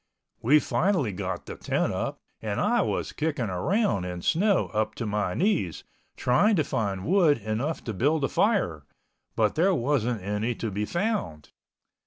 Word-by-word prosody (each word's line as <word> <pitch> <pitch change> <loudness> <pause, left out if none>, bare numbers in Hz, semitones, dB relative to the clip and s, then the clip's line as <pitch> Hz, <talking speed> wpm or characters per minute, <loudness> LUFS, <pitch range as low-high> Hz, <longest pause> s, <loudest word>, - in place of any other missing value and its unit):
We 140 +7 +5
finally 175 - +1
got 95 0 -4
the - - -7
tent - - -1
up - - -3 0.2
and - - -2
I - - +2
was - - -2
kicking 145 -9 -2
around 100 - +1
in 90 -1 -5
snow 200 +4 +2
up 110 0 0
to 115 - -4
my 105 -3 -1
knees, 170 - 0 0.3
trying 135 - +3
to 155 - +2
find 100 -7 -2
wood 170 -4 +4
enough 115 +8 -3
to 115 - -4
build 145 +9 +1
a - - +3
fire, 185 - +1 0.5
but 110 -2 +2
there 185 +4 +3
wasn't 120 - 0
any 105 +4 -1
to 110 -1 -4
be 105 +2 -2
found. 170 - -2
120 Hz, 165 wpm, -26 LUFS, 100-165 Hz, 0.5 s, We